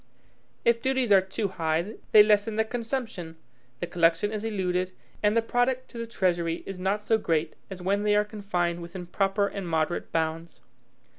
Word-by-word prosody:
If 235 0 +3
duties 260 -3 +1
are 195 -1 +8
too 190 +2 -3
high, 170 +3 -1
they 210 - +9
lessen 210 +1 +2
the 220 - +3
consumption; 230 -8 -4 0.5
the - - 0
collection 170 +4 +2
is 215 -1 -4
eluded; 185 -4 -1 0.3
and 210 +2 +3
the 230 - +3
product 245 +2 0
to 235 - -8
the 230 - -4
treasury 175 -6 0
is 195 -2 -6
not 195 +3 0
so 220 +1 +2
great 165 -5 0 0.2
as 185 -2 -8
when 200 +2 +1
they 210 0 +2
are 210 0 +3
confined 180 -5 -2
within 175 +1 -7
proper 195 +3 +1
and 200 -2 -5
moderate 160 +1 -1
bounds. 165 0 -2
195 Hz, 175 wpm, -27 LUFS, 175-220 Hz, 0.5 s, they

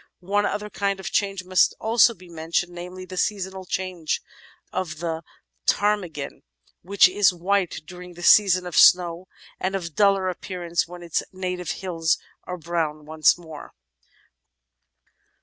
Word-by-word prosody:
One 205 +3 0
other 210 0 -4
kind 200 -1 -1
of 190 - -5
change 195 -2 0
must 185 0 +3
also 230 +1 +4
be 185 0 -16
mentioned, 170 +1 -2
namely, 180 +1 -8
the 185 0 -9
seasonal 190 -2 -2
changes 180 -4 -2 0.5
of 170 -4 -3
the 165 0 -3 0.5
Ptarmigan, 185 -9 0 0.4
which 200 +2 +5
is 195 +2 +3
white 180 0 -1
during 180 +1 -11
the 175 - -10
season 185 -2 +6
of 175 -3 -6
snow 175 0 +5 0.3
and 190 +1 -1
of 170 -4 -4
duller 195 +1 +3
appearance 175 -2 -2
when 175 0 -10
its 170 -3 -1
native 180 -3 -4 0.2
hills 165 -3 +1 0.3
are 180 - -5
brown 160 -3 -3
once 155 +2 +3
more. 160 -3 -11
180 Hz, 140 wpm, -24 LUFS, 170-190 Hz, 0.5 s, season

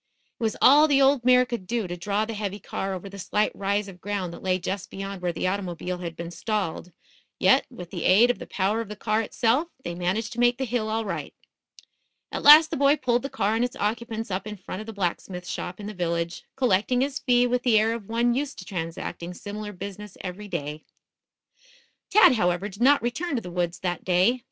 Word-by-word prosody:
It - - -5
was 220 - 0
all 295 +3 +8
the 280 -2 +4
old 270 -2 +4
mare 250 0 +5
could 235 -7 -5
do 230 0 -1
to 175 - -4
draw 200 +4 -1
the 225 - -5
heavy 205 -1 -4
car 195 -1 -4
over 185 +2 -7
the 200 0 -10
slight 210 +3 0
rise 200 +1 -1
of 180 -2 -12
ground 195 -3 -3
that - - -10
lay 185 -1 +1
just 190 +1 -4
beyoud 195 -1 -6
where 180 -1 0
the 170 - -3
automobile 180 -2 -3
had 170 -2 -6
been 170 +1 -6
stalled; 180 -2 -3 0.5
yet, - - +4
with 175 -1 -10
the - - -4
aid 225 +7 +6
of - - -8
the - - -8
power 200 +4 0
of 225 - -7
the 210 - -6
car 215 +1 0
itself, 235 +7 +1 0.2
they 175 - -4
managed 180 +6 -2
to 240 - -7
make 240 0 +4
the 265 - -2
hill 230 -2 -1
all 220 +1 -1
right. 195 - -5 1.0
At - - -3
last 310 +2 +9
the - - -1
boy 280 +2 +4
pulled 245 -3 +1
the 275 - -4
car 210 -4 0
and 225 +2 +1
its 245 - -2
occupants 225 0 -3
up 190 +2 -3
in 210 -1 -6
front 185 0 -7
of 215 - -10
the - - -5
blacksmith 180 -1 -3
shop 180 +2 -5
in 205 - -7
the 210 - -5
village, 170 -2 -2
collecting 250 0 +2
his 275 +1 -1
fee 245 -1 +3
with 245 0 0
the 245 -4 +4
air 220 +1 +3
of 225 -4 -7
one 235 +1 +2
used 275 +2 -3
to 185 - -9
transacting 170 0 -5
similar 210 +1 -6
business 200 +1 -8
every 195 +3 -6
day. 155 -4 -5 1.3
Tad, 425 -9 +7
however, 180 -3 +1
did 200 +3 -12
not 280 +2 +5
return 285 +7 -2
to 235 - -1
the 180 - -7
woods 175 -1 -1
that 175 -2 -2
day. 185 +8 +3
210 Hz, 230 wpm, -25 LUFS, 180-240 Hz, 1.3 s, last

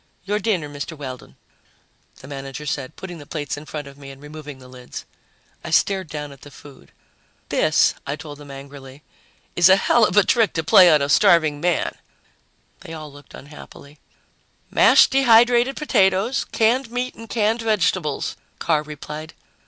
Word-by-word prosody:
"Your 205 +1 -1
dinner, 195 -8 -1
Mr. 145 +2 -7
Weldon," 130 - -9 0.9
the 130 - -12
manager 135 +1 -7
said, 140 -3 -4
putting 180 -3 -9
the 145 - -13
plates 145 -5 -4
in 145 +1 -11
front 150 -2 -6
of 140 0 -14
me 140 -1 -11
and 135 0 -12
removing 150 -1 -10
the 130 -1 -15
lids. 125 -1 -10 0.6
I - - -6
stared 190 +3 +1
down 150 -1 -6
at 140 - -15
the 145 - -12
food. 140 0 -16 0.6
"This," - - +2
I 140 - -2
told 150 -2 -10
them 145 -1 -13
angrily, 135 0 -11 0.5
"is 175 +1 +5
a 190 - +8
hell 230 +4 +2
of 210 - +2
a 205 - +7
trick 225 -3 +2
to 160 - -2
play 185 +1 +7
on 150 -3 +4
a - - -1
starving 150 0 +3
man!" 175 -1 0 0.9
They 165 - -10
all 155 -3 -9
looked 145 -1 -15
unhappy. 145 0 -14 0.7
"Mashed - - +5
dehydrated 245 0 +4
potatoes, 195 -4 +1
canned 235 +3 +1
meat 245 +1 -3
and 225 0 -12
canned 225 +1 0
vegetables," 185 -8 -1 0.2
Carr 155 -3 0
replied. 150 +1 -9
155 Hz, 170 wpm, -21 LUFS, 145-200 Hz, 0.9 s, a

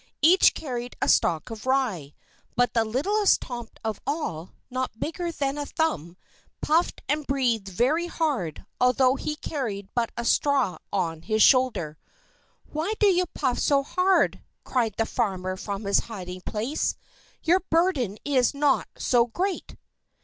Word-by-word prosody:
Each 355 +5 +6
carried 245 -4 -5
a - - 0
stalk 165 +5 +2
of 225 +3 -8
rye; 220 - 0 0.4
but 245 0 +2
the 230 - +3
littlest 380 - +2
Tomt 240 -2 -7
of 220 -2 -3
all, 190 - -3 0.2
not 255 -3 -3
bigger 340 +2 -3
than 280 -2 -2
a 290 - -3
thumb, 180 - -2 0.4
puffed 330 +3 +1
and 295 +1 -1
breathed 245 -7 0
very 265 - +1
hard, 280 - -2
although 255 +1 +4
he 300 +2 -3
carried 220 -11 -4
but 235 -1 0
a 235 - -3
straw 265 - +2
on 165 -5 -1
his 215 +3 +2
shoulder. 245 - +3 0.7
"Why 320 +8 -1
do - - +3
you 365 -2 +3
puff 260 -4 0
so 280 -1 +3
hard?" 370 +6 +2 0.2
cried 230 -5 0
the 225 - +1
farmer 190 -6 -2
from 200 +2 -5
his 200 0 +3
hiding 185 -5 -7
place. 225 +11 -2 0.5
"Your 350 +3 +4
burden 320 - +1
is 265 -2 +2
not 285 -1 +2
so 240 -1 +3
great!" 370 - -3
250 Hz, 150 wpm, -26 LUFS, 210-300 Hz, 0.7 s, Each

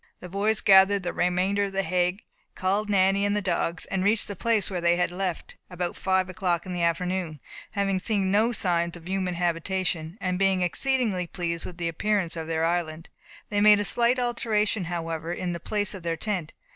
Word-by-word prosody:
The 180 - -9
boys 205 +4 +1
gathered 195 0 +5
the 175 - -3
remainder 185 +3 +1
of 195 - -6
the 195 0 0
hay, 180 +3 0 0.3
called 200 +3 0
Nanny 195 0 +3
and 205 0 +1
the - - +2
dogs, 175 -3 -1
and 190 -1 -2
reached 210 +2 +2
the 205 - -4
place 225 +1 +1
which 185 -3 -3
they 170 0 +3
had 180 0 0
left, 180 -2 -4
about 180 -1 -3
five 190 -1 +1
o'clock 180 -2 -1
in 185 - -5
the 175 - -2
afternoon 170 -1 -1 0.3
having 195 -2 0
seen 195 -1 +1
no 220 +4 +3
signs 170 -5 0
of 170 0 -13
human 185 -1 -1
habitation, 175 0 -2
and 180 -1 -2
being 190 -2 +2
exceedingly 200 - 0
pleased 170 -1 -4
with 175 - -8
the 170 -1 -2
appearance 180 +1 -1
of 160 -1 -5
their 165 0 0
island; 165 -1 -2 0.4
they 205 -2 0
made 210 0 +7
a 205 - +1
slight 240 +4 +3
alteration, 220 -5 0
however, 165 -1 -4
in 175 0 -3
the 170 - -5
place 205 +3 -1
of 190 - -8
their 165 -1 -2
tent. 180 -4 -3
185 Hz, 200 wpm, -26 LUFS, 175-200 Hz, 0.4 s, made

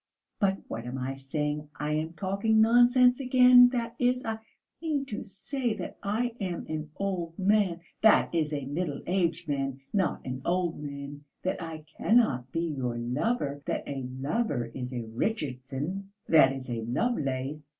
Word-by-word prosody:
But 195 -2 +2
what 115 +1 -5
am 125 +2 -4
I 130 +1 -3
saying? 150 +2 -3
I 150 +1 -2
am 155 +2 -1
talking 200 +4 +1
nonsense 245 +3 +6
again; 250 -1 +7
that 235 -2 -3
is, 250 0 +1
I 220 -1 -2 0.4
mean 300 -4 -1
to 240 -6 -5
say 235 +4 -3
that - - -7
I 225 +5 0
am 180 -3 -3
an 155 -1 -4
old 180 -4 -3
man 195 -3 +2 0.2
that 220 -4 +5
is, 160 -3 +1
a 145 -3 -3
middle 145 +1 -3
aged 175 -2 0
man, 135 -2 -2
not 195 -4 0
an 130 0 -4
old 175 -2 0
man; 140 0 -7 0.2
that 185 - -1
I 160 -2 -7
cannot 135 - +3
be 165 - -1
your 135 -8 -2
lover; 140 - -1
that - - -1
a 140 -1 -3 0.2
lover 135 - -1
is 125 -1 -5
a 120 -2 -3
Richardson 140 - -3 0.2
that 150 -5 +6
is, 135 -1 -6
a 120 -2 -3
Lovelace.... 140 - -2
165 Hz, 160 wpm, -28 LUFS, 135-220 Hz, 0.4 s, again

